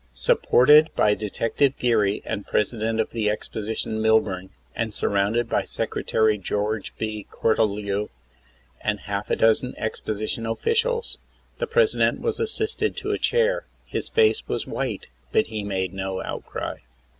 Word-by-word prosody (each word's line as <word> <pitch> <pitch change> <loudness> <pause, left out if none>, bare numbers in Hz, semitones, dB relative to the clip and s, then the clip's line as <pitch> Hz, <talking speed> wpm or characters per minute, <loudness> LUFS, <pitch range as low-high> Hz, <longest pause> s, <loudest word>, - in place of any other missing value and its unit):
Supported 150 - +5
by 105 - +4
Detective 115 +6 0
Geary 105 -5 +1
and 100 - -4
President 110 +1 0
of 110 - 0
the 110 -2 0
Exposition 110 +1 -3
Milburn, 105 -4 +2 0.3
and 110 -2 -2
surrounded 105 +4 +1
by - - +1
Secretary 110 -1 0
George 105 +2 -2
B. 110 -2 -4
Cortelyou 105 -2 0 0.7
and 105 -2 -1
half 100 0 -4
a - - +2
dozen 115 +3 +3
exposi 110 -1 -3
tion 115 -1 -2
officials, 465 - 0 0.4
the 485 - -1
President 470 -3 +3
was 455 -2 -2
assisted 440 -1 -1
to - - -2
a - - -1
chair. 480 +1 +1 0.2
His - - -3
face 445 -1 +3
was - - -2
white, - - -3 0.3
but 220 - +3
he 105 -1 -2
made 95 -2 -2
no 95 0 -3
outcry. - - -5
110 Hz, 140 wpm, -24 LUFS, 105-125 Hz, 0.7 s, Supported